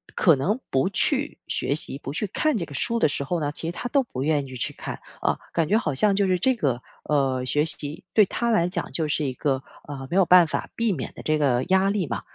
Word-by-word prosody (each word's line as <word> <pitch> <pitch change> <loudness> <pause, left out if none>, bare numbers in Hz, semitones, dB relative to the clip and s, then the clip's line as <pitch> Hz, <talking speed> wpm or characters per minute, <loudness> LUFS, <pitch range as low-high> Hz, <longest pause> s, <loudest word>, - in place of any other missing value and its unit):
可 170 -6 +5
能 195 - 0
不 135 +7 +2
去 285 +8 0
学 140 - -1
习， 140 -2 -3
不 140 - -6
去 155 +9 -2
看 290 +6 0
这 170 - -2
个 145 - -12
书 235 - -1
的 230 - +4
时 140 -1 -3
候 170 +4 -1
呢， 145 -1 -1
其 160 - -5
实 - - -1
他 245 - -5
都 280 - +3
不 135 - -5
愿 145 -2 +1
意 130 - -9
去 125 - -3
看， - - -7 0.2
啊， - - +1 0.2
感 165 -2 +1
觉 215 - +4
好 155 -10 -1
像 200 +9 +3
就 200 0 +2
是 185 -1 +2
这 260 +8 +2
个， 135 - -1 0.2
呃， 135 -3 +1
学 145 +4 +1
习 145 -1 -1
对 215 - +7
他 235 +4 -1
来 175 -6 +2
讲 180 - -4
就 160 -2 -1
是 150 0 0
一 130 - -2
个， 135 +1 -1 0.2
呃， 135 -2 -7
没 - - -1
有 195 - +6
办 180 0 +7
法 155 - -3
避 230 -2 +1
免 145 -9 -4
的 - - -9
这 155 0 +1
个 130 -4 +2
压 190 +1 +4
力 200 -3 0
嘛， 115 -7 -3
155 Hz, 280 characters per minute, -24 LUFS, 140-200 Hz, 0.2 s, 对